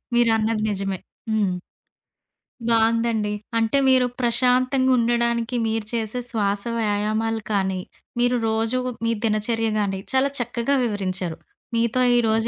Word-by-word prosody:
మీరన్నది 225 -2 +2
నిజమే. 195 -1 -3 0.3
హ్మ్. 210 -4 +1 1.2
బావుందండి. 225 -1 +2 0.3
అంటే, 225 +4 +2
మీరు 255 -1 +5 0.2
ప్రశాంతంగా 255 +2 +2
ఉండడానికి 235 0 +1
మీరు 220 -1 -1
చేసే 225 +1 -2
శ్వాస 205 -3 0
వ్యాయామాలు 215 +1 0
కానీ, 190 -2 0 0.4
మీరు 245 0 +3
రోజు 225 +3 +1 0.3
మీ 230 - +2
దినచర్య 225 +1 0
గాని, 195 -2 -1
చాలా 265 +1 +3
చక్కగా 240 +3 0
వివరించారు. 185 -6 -2 0.4
మీతో 235 +2 +1 0.2
ఈరోజు 225 -1 +2
225 Hz, 110 wpm, -23 LUFS, 210-235 Hz, 1.2 s, మీరు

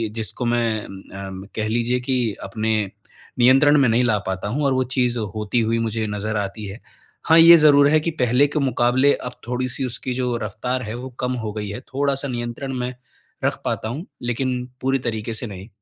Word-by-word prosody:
जिसको 115 +2 -3
मैं, 115 -2 0
अम्म 95 0 -9
कह 110 0 -1
लीजिए 120 +2 0
कि 125 -3 0
अपने 110 +3 -1 0.7
नियंत्रण 135 +4 +6
में 135 - +4
नहीं 115 +2 +3
ला 110 -4 +2
पाता 95 +1 -2
हूँ, 140 +8 -1
और 135 - +3
वो 130 - +2
चीज़ 125 -2 +1 0.2
होती 105 +2 0
हुई 115 0 +1
मुझे 110 -1 -1
नज़र 105 +1 -3
आती 105 +1 -4
है। 100 +4 -8 0.5
हाँ, 160 0 +6
ये 170 +1 +10
ज़रूर 145 -2 +6
है 155 +1 +4
कि 165 +2 -2
पहले 125 +4 +4
के 150 - -2
मुकाबले 130 0 +3
अब 125 - -5 0.2
थोड़ी-सी 125 +1 -2
उसकी 125 +1 -4
जो 125 -1 -1
रफ़्तार 125 +5 -3
है 110 0 -5
वो 125 +2 -6
कम 125 0 -1
हो 105 - -3
गई 105 -2 -4
है। 100 +4 -5
थोड़ा-सा 140 0 0
नियंत्रण 120 +2 -4
में 125 +1 -3 0.5
रख - - 0
पाता 110 - -1
हूँ, 150 - -5 0.2
लेकिन 125 +1 -2 0.2
पूरी 135 +1 +1
तरीके 115 -2 -3
से 110 +2 -4
नहीं। 95 0 -9
120 Hz, 195 wpm, -22 LUFS, 110-130 Hz, 0.7 s, ये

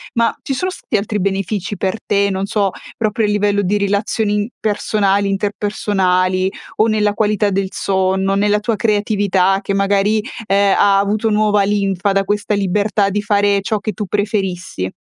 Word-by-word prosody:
ma 230 0 +2
ci 275 - -2
sono 365 +8 -1
stati 300 -10 -3
altri 210 +1 -2
benefici 195 +1 -2
per 190 +2 -1
te, 200 0 +2
non 190 0 -2
so, 205 -1 0 0.3
proprio 220 0 0
a - - 0
livello 205 0 +1
di 200 +3 +1
relazioni 205 +1 0
in 205 0 0
personali, 205 -1 +1
interpersonali, 195 -2 0 0.3
o 215 - +3
nella 215 -2 +1
qualità 210 -1 +1
del 195 0 -1
sonno, 190 0 0
nella 205 +1 +2
tua 220 +2 -1
creatività 205 -3 +1
che, 195 - -2
magari, 200 +2 +2 0.2
ehm, 200 0 +3
ha 200 -1 +4
avuto 215 +2 0
nuova 210 -1 +2
linfa 195 -1 0
da 195 0 +1
questa 205 +1 -1
libertà 205 +1 +1
di 210 +1 -2
fare 205 -1 +2
ciò 215 +2 -1
che 210 +1 -4
tu 210 - -4
preferissi? 190 - -2
205 Hz, 170 wpm, -17 LUFS, 195-210 Hz, 0.3 s, ha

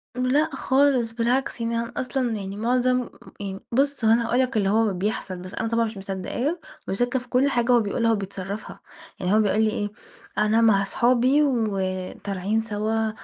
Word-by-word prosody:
لأ 255 +5 +2
خالص، 265 -4 +2
بالعكس 240 +1 0
يعني 230 0 -1
أنا 235 +1 -4
أصلًا 255 -1 -1
يعني 200 -2 -4
معظم 250 +2 +1 0.3
يعني 195 -1 -5
بُصّ 275 0 +1
هو 220 - +5
أنا 235 +1 +3
هاقول 245 - +1
لك 255 -2 +1
اللي 195 -2 +2
هو 220 0 +2
بيحصل، 190 0 -3
بس 185 +1 -9
أنا 225 - -2
طبعًا 230 0 +1
مش 220 -2 -6
مصدقاه 195 - -3 0.3
مش - - -1
وشاكّة 245 +4 +1
في 250 - -13
كُلّ 260 +3 +3
حاجة 240 -1 +1
هو 240 - +6
بيقولها 230 +2 +1
وبيتصرّفها، 200 0 -4 0.4
يعني 180 +2 0
هو 215 - +5
بيقول 215 +1 +2
لي 220 - +3
إيه: 205 -2 -3 0.5
"أنا 215 +2 +3
مع 205 -3 +4
صحابي 250 +7 +3
وطالعين 200 -3 -1
سوا 220 0 -1
225 Hz, 180 wpm, -24 LUFS, 200-250 Hz, 0.5 s, هو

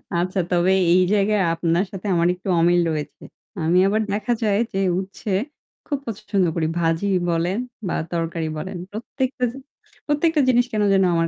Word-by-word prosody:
আচ্ছা 185 +3 0
তবে 180 +1 +3 0.2
এই 185 - +5
জায়গায় 210 0 +2
আপনার 170 +3 +1
সাথে 195 +1 -6
আমার 170 0 +3
একটু 180 +2 -11
অমিল 175 +1 +4
রয়েছে। 150 -2 -5 0.4
আমি 165 +3 +2
আবার 215 +2 +1
দেখা 210 +4 0
যায় 205 -2 +2 0.2
যে - - -2 0.2
উচ্ছে 195 +3 -7 0.6
খুব 290 - -1
পছন্দ 205 -3 -1
করি। 160 -2 0
ভাজি 165 +3 +1 0.2
বলেন 170 +3 0 0.3
বা - - -1 0.2
তরকারি 165 -1 -2
বলেন। 185 +4 -5
প্রত্যেকটা 250 +4 -3
জি 255 - -11 0.5
প্রত্যেকটা 300 +1 +2
জিনিস 245 -1 +4
কেনো 210 -1 +1
যেন 195 0 +4
আমার 165 0 +2
190 Hz, 165 wpm, -22 LUFS, 170-215 Hz, 0.6 s, এই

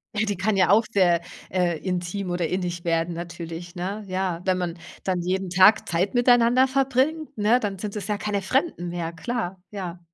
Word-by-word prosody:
Ja, 220 - +1
die 205 -3 -1
kann 200 +3 +1
ja 185 -2 +3
auch 215 +3 +5
sehr, 175 -5 +3 0.3
äh, 175 -3 0
intim 180 +1 -3
oder 175 -1 -1
innig 175 -1 -3
werden 165 0 0
natürlich, 170 0 -7
ne? 195 +4 -4
Ja, 185 -2 -2
wenn 185 -1 +2
man 175 -1 -3 0.3
dann 185 -2 0
jeden 190 +1 -1
Tag 190 +4 +5
Zeit 180 +4 0
miteinander 245 +1 +5
verbringt, 275 +3 0
ne? 220 +4 +3
Dann 200 -4 -3
sind 210 0 -5
es 200 -1 -4
ja 210 -1 -1
keine 205 -2 -2
Fremden 255 - 0
mehr, 170 -1 -3
klar. 195 -1 -4
Ja, 180 -4 -6
190 Hz, 190 wpm, -24 LUFS, 175-215 Hz, 0.3 s, auch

